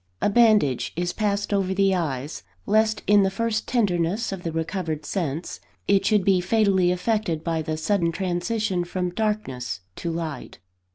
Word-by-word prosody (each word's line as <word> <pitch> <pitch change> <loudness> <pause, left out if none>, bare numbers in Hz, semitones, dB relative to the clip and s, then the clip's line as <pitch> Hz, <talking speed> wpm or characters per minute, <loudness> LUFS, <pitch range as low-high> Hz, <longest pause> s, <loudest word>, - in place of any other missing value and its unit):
A - - +1
bandage 210 - +3
is 175 +1 -1
passed 205 -1 -1
over 190 -1 +1
the 195 0 +3
eyes, 150 -5 -3 0.2
lest 220 0 +2
in 205 0 +5
the 195 - +3
first 215 +2 -2
tenderness 200 -2 0
of 195 -2 -5
the 165 - -3
recovered 160 -1 -3
sense, 165 -2 -3 0.3
it 200 -1 +3
should 210 -4 +3
be 190 -2 +4
fatally 190 -2 +3
affected 180 -3 -1
by 165 -1 -1
the 155 0 -3
sudden 170 0 +1
transition 185 +2 -1
from 180 0 -3
darkness 135 - -2 0.2
to 170 - -3
light. 165 -5 -5
185 Hz, 160 wpm, -24 LUFS, 165-210 Hz, 0.3 s, in